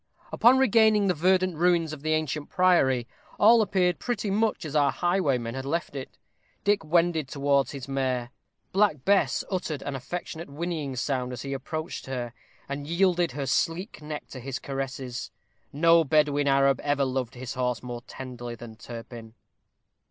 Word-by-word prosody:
Upon 245 Hz, +3 st, +5 dB
regaining 220 Hz, -4 st, +4 dB
the 185 Hz, -, +3 dB
verdant 185 Hz, +1 st, +2 dB
ruins 170 Hz, -2 st, +2 dB
of 150 Hz, -, -8 dB
the 155 Hz, +1 st, 0 dB
ancient 155 Hz, -1 st, -2 dB
priory, 135 Hz, -10 st, +3 dB, 0.3 s
all 225 Hz, +2 st, +7 dB
appeared 180 Hz, -4 st, +1 dB
pretty 220 Hz, -4 st, -2 dB
much 215 Hz, -3 st, 0 dB
as 155 Hz, -1 st, -6 dB
our 145 Hz, -2 st, +4 dB
highwayman 140 Hz, -10 st, 0 dB
had 135 Hz, 0 st, -4 dB
left 150 Hz, +2 st, -3 dB
it. 135 Hz, -1 st, -7 dB, 0.5 s
Dick 205 Hz, -2 st, +2 dB
wended 165 Hz, -2 st, +2 dB
towards 140 Hz, 0 st, +1 dB
his 135 Hz, -3 st, -7 dB
mare. 130 Hz, -3 st, -1 dB, 0.4 s
Black 190 Hz, -9 st, +2 dB
Bess 200 Hz, 0 st, +3 dB
uttered 165 Hz, -6 st, -2 dB
an 140 Hz, -, -4 dB
affectionate 170 Hz, +4 st, -6 dB
whinnying 150 Hz, -2 st, -3 dB
sound 125 Hz, 0 st, -1 dB
as 120 Hz, -, -6 dB
he 140 Hz, 0 st, -4 dB
approached 155 Hz, +5 st, -5 dB
her, 120 Hz, -3 st, -4 dB, 0.3 s
and 140 Hz, +1 st, -5 dB
yielded 175 Hz, -2 st, +2 dB
her 140 Hz, 0 st, -3 dB
sleek 165 Hz, -, -1 dB
neck 150 Hz, 0 st, -6 dB
to 130 Hz, -, -8 dB
his 130 Hz, +1 st, -4 dB
caresses. 135 Hz, -2 st, -5 dB, 0.4 s
No 165 Hz, +3 st, +5 dB
Bedouin 145 Hz, -1 st, +2 dB
Arab 135 Hz, 0 st, +4 dB
ever 145 Hz, -1 st, +1 dB
loved 130 Hz, -2 st, -2 dB
his 125 Hz, 0 st, -6 dB
horse 125 Hz, -2 st, -1 dB
more 120 Hz, -1 st, -6 dB
tenderly 120 Hz, -2 st, -7 dB
than 115 Hz, -1 st, -11 dB
Turpin. 115 Hz, -1 st, -9 dB
145 Hz, 160 wpm, -27 LUFS, 130-175 Hz, 0.5 s, all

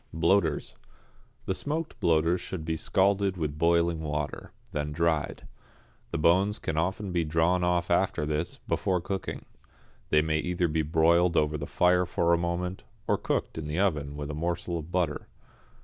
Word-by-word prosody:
=Bloaters.= 95 Hz, +5 st, +1 dB, 0.7 s
The -, -, 0 dB
smoked 155 Hz, -, -3 dB
bloaters 85 Hz, +2 st, +2 dB
should 80 Hz, -5 st, -5 dB
be 80 Hz, 0 st, -1 dB
scalded 95 Hz, +3 st, +1 dB
with 75 Hz, -3 st, -3 dB
boiling 85 Hz, 0 st, +3 dB
water, 75 Hz, -2 st, -4 dB, 0.2 s
then 75 Hz, 0 st, -2 dB
dried. 80 Hz, -1 st, -1 dB, 0.6 s
The -, -, -3 dB
bones 95 Hz, +6 st, +3 dB
can 80 Hz, -, -3 dB
often 95 Hz, +4 st, -1 dB
be 85 Hz, -2 st, +1 dB
drawn 80 Hz, +3 st, +2 dB
off 90 Hz, 0 st, +1 dB
after 85 Hz, -4 st, +2 dB
this, 75 Hz, +3 st, -2 dB
before 90 Hz, -1 st, +1 dB
cooking. 95 Hz, +2 st, -4 dB, 0.6 s
They 75 Hz, 0 st, +4 dB
may 80 Hz, 0 st, 0 dB
either 90 Hz, +1 st, 0 dB
be 80 Hz, 0 st, 0 dB
broiled 85 Hz, +3 st, +3 dB
over 75 Hz, 0 st, +2 dB
the 75 Hz, -1 st, -4 dB
fire 90 Hz, 0 st, +3 dB
for 85 Hz, -1 st, +2 dB
a -, -, +4 dB
moment, 90 Hz, +2 st, -2 dB, 0.2 s
or -, -, +3 dB
cooked -, -, -2 dB
in 75 Hz, -, -5 dB
the 75 Hz, +2 st, -3 dB
oven 75 Hz, -7 st, 0 dB
with 75 Hz, 0 st, -4 dB
a -, -, -5 dB
morsel 85 Hz, +2 st, -2 dB
of 80 Hz, +1 st, -9 dB
butter. 85 Hz, -5 st, -1 dB
85 Hz, 165 wpm, -28 LUFS, 80-90 Hz, 0.7 s, They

